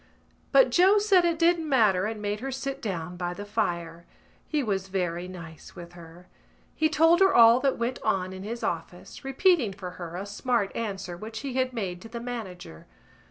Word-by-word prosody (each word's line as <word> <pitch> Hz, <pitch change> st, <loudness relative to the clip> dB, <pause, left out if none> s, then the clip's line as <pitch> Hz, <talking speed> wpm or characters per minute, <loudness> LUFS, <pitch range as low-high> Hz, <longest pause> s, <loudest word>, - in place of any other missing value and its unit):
But -, -, +5 dB
Joe 380 Hz, +4 st, +5 dB
said 400 Hz, -4 st, +4 dB
it 335 Hz, -1 st, +1 dB
didn't 335 Hz, -1 st, +2 dB
matter 210 Hz, -7 st, +3 dB
and 220 Hz, -1 st, -5 dB
made 205 Hz, 0 st, -2 dB
her 270 Hz, +3 st, -4 dB
sit 275 Hz, +1 st, -4 dB
down 180 Hz, -5 st, -4 dB
by 175 Hz, 0 st, -3 dB
the 205 Hz, -, -7 dB
fire. 170 Hz, -5 st, -3 dB, 0.4 s
He 300 Hz, -3 st, 0 dB
was 195 Hz, -4 st, -2 dB
very 180 Hz, -2 st, -2 dB
nice 165 Hz, -4 st, -11 dB
with 175 Hz, 0 st, -10 dB
her. 170 Hz, +1 st, -13 dB, 0.5 s
He 315 Hz, 0 st, +1 dB
told 325 Hz, +2 st, +4 dB
her 385 Hz, 0 st, +4 dB
all 230 Hz, +1 st, +8 dB
that 270 Hz, 0 st, 0 dB
went 235 Hz, +2 st, -3 dB
on 185 Hz, -1 st, -1 dB
in 190 Hz, -, -8 dB
his 230 Hz, +4 st, -6 dB
office, 175 Hz, +1 st, -5 dB
repeating 270 Hz, -, +2 dB
for 185 Hz, -2 st, -7 dB
her 170 Hz, 0 st, -6 dB
a 190 Hz, +2 st, -4 dB
smart 205 Hz, +1 st, -1 dB
answer 195 Hz, -5 st, -4 dB
which 220 Hz, +4 st, -7 dB
he 275 Hz, -2 st, -5 dB
had 255 Hz, 0 st, 0 dB
made 190 Hz, -7 st, -4 dB
to 225 Hz, -, -11 dB
the 235 Hz, +1 st, -6 dB
manager. 200 Hz, -, -8 dB
215 Hz, 195 wpm, -27 LUFS, 180-265 Hz, 0.5 s, all